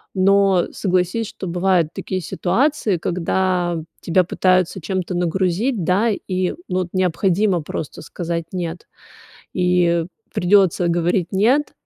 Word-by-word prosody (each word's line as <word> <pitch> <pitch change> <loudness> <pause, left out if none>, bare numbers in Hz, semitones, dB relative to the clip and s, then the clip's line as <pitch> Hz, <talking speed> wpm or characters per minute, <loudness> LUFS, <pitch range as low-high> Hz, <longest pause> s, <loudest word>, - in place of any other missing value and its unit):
Но 195 -1 +3
согласись, 185 +3 0
что 190 - -7
бывают 175 -2 +1
такие 185 - -3
ситуации, 220 - 0
когда 175 0 0 0.2
тебя 180 +2 +2
пытаются 185 +1 +1
чем-то 185 +1 -3
нагрузить, 185 +6 0
да, 200 +7 +2
и, 185 -3 -1 0.2
ну, 185 0 -1
вот 180 -1 -3
необходимо 185 +1 +1
просто 150 0 -6
сказать 170 +1 -4
нет. 175 -2 -5 0.7
И 180 -2 +2 0.3
придётся 180 -1 +3
говорить 175 +1 +1
нет, 245 +10 +2
185 Hz, 115 wpm, -20 LUFS, 175-195 Hz, 0.7 s, Но